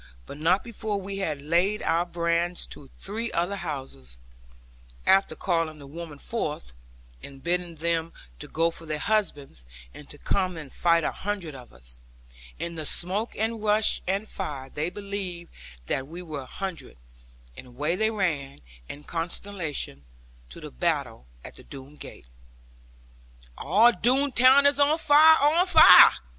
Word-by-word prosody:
But 140 - -10
not 180 +5 +2
before 220 -3 -4
we 195 +1 -6
had 150 -7 -3
laid 175 +7 +1
our 170 +2 +1
brands 170 +1 -1
to 140 - -14
three 225 +4 -5
other 175 +4 -1
houses, 135 - -7 0.9
after 195 0 +3
calling 165 -4 -1
the 145 - -12
women 155 +1 -9
forth, 150 - -5 0.5
and 135 -1 -12
bidding 175 0 -1
them 165 +1 -1 0.4
go 165 +1 +1
for 165 0 -12
their 155 0 -2
husbands, 150 - -1 0.3
and 145 - -13
to 145 - -9
come 185 +2 -1
and 150 -4 -10
fight 170 -1 +2
a - - 0
hundred 195 -6 -5
of 125 -2 -12
us. - - -6 0.6
In 170 - -5
the 160 -2 -5
smoke 195 +6 -1
and 225 +1 -2
rush, 210 0 +2
and 195 +3 -1
fire, 140 -11 -6
they 155 +3 -2
believed 190 -3 -6 0.3
that 135 - -2
we 170 +4 -9
were 155 -4 -6
a - - -10
hundred; 190 - -7 0.6
and - - -11
away 145 +7 -2
they 220 +3 +1
ran, 155 - -2 0.3
in 145 - -9
consternation, 165 - -5 0.5
to - - -11
the - - -9
battle 60 0 -2 0.2
at - - -11
the - - -14
Doone 140 +1 -12
gate. - - -11 1.3
'All 210 +10 +4
Doone 260 +7 +2
town 260 +3 +6
is 285 0 +4
on 290 +2 +4
fire, 315 +1 +6
on 320 +6 +3
fire!' 320 - +9
170 Hz, 155 wpm, -26 LUFS, 150-205 Hz, 1.3 s, fire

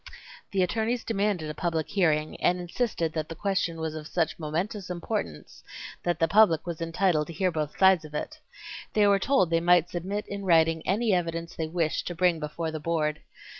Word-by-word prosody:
The 190 -2 +1
attorneys 225 +5 -1
demanded 200 -6 -1
a - - -7
public 165 -1 -2
hearing, 155 -6 +1
and 180 +1 +2
insisted 175 -3 -2
that 155 -1 -3
the 165 - -6
question 190 -3 -1
was 160 -1 -3
of 155 -1 -7
such 165 -2 -1
momentous 180 +6 -3
importance 85 - -5 0.4
that 175 -2 0
the 165 - +2
public 175 -4 +4
was 170 -2 -5
entitled 165 -2 +1
to 170 - -7
hear 185 +2 0
both 150 -2 -3
sides 190 -3 +5
of 150 -1 -10
it. - - -5 0.5
They 210 -1 +4
were 200 -1 +4
told 195 -7 +2
they 165 0 +2
might 175 0 +4
submit 190 +4 -3
in 200 0 -5
writing 165 -3 +3
any 215 +3 +2
evidence 170 -1 -2
they 160 - -2
wished 160 -1 -1
to 175 - -4
bring 175 -1 +2
before 160 +2 -4
the 155 - -4
Board. 150 -1 -1
170 Hz, 195 wpm, -27 LUFS, 160-190 Hz, 0.5 s, sides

